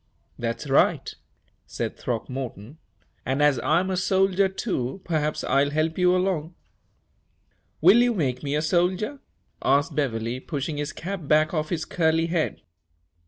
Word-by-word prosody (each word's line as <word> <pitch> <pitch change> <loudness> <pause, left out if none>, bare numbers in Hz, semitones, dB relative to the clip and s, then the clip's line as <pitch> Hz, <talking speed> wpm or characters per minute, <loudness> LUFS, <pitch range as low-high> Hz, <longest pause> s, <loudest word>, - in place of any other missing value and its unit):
"That's 115 +4 -3
right," 135 - +2 0.5
said - - -4
Throckmorton, 125 +2 -5 0.4
"and, 135 +3 0
as 145 -4 +4
I'm 185 +9 +1
a - - 0
soldier, 190 +1 +2
too, 190 - -3
perhaps 155 -2 -1
I'll 140 +1 +2
help 155 +2 0
you 180 0 +4
along." 180 -3 -1 1.3
"Will 185 +8 +7
you 245 -1 +2
make 130 -8 -1
me 145 0 -2
a 150 - 0
soldier?" 185 - 0 0.4
asked 145 +4 +2
Beverley, 120 -4 -1
pushing 145 +1 -4
his 150 +1 -3
cap 185 -3 -6
back 155 +2 +3
off 155 -2 -1
his 165 -3 -2
curly 165 -1 +1
head. 165 -1 -1
155 Hz, 140 wpm, -25 LUFS, 140-180 Hz, 1.3 s, Will